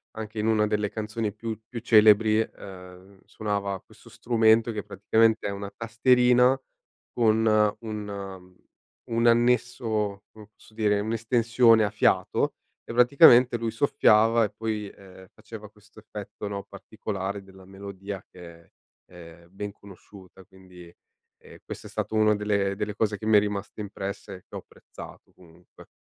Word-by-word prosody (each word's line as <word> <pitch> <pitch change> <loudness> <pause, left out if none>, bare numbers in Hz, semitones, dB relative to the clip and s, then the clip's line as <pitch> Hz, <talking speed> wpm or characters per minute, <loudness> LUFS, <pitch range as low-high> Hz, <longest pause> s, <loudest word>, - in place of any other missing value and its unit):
anche 110 0 -8
in 105 - -1
una 110 -1 +2
delle 105 -1 -1
canzoni 110 0 -4
più 110 +1 -6
più 120 - -6
celebri, 110 -1 +5
ehm, 95 -2 -8
suonava 100 -2 -3
questo - - -19
strumento 115 -1 +2
che 105 -2 -4
praticamente 110 +3 +1
è - - -3
una 100 0 -6
tastierina 125 +3 +3 0.5
con 110 -1 +2 0.4
un 100 -4 -8 0.5
un 115 0 0
annesso, 115 -4 +1
come 105 -1 -15
posso - - -21
dire, 105 -2 +1
un'estensione 115 +1 +2
a 105 - -1
fiato - - +1 0.3
e - - -8
praticamente 125 0 +6
lui 115 0 -3
soffiava 115 -2 +3
e - - -4
poi, 105 -2 -4
ehm, 95 -1 -16
faceva 110 -2 -11
questo 105 +1 -20
effetto, 105 -1 -8
no, 100 -1 -5
particolare, 100 -1 -6
della 95 -1 -17
melodia 100 0 -9
che 85 -2 -13
è, 85 - -28 0.4
ehm, 85 -1 -14
ben 100 +1 -7
conosciuta 95 -1 -16
quindi, 90 -2 -16 0.5
ehm, - - -15
questa - - -8
è - - -13
stato - - -4
una 110 0 +4
delle 100 -1 -1
delle 105 0 -4
cose 105 -2 -1
che 110 - -9
mi 110 0 +3
è - - +8
rimasto 105 +1 -5
impresse 100 0 -7
e - - -11
che - - -12
ho - - -4
apprezzato, - - -14
comunque. 85 0 -19
105 Hz, 150 wpm, -26 LUFS, 100-115 Hz, 0.5 s, è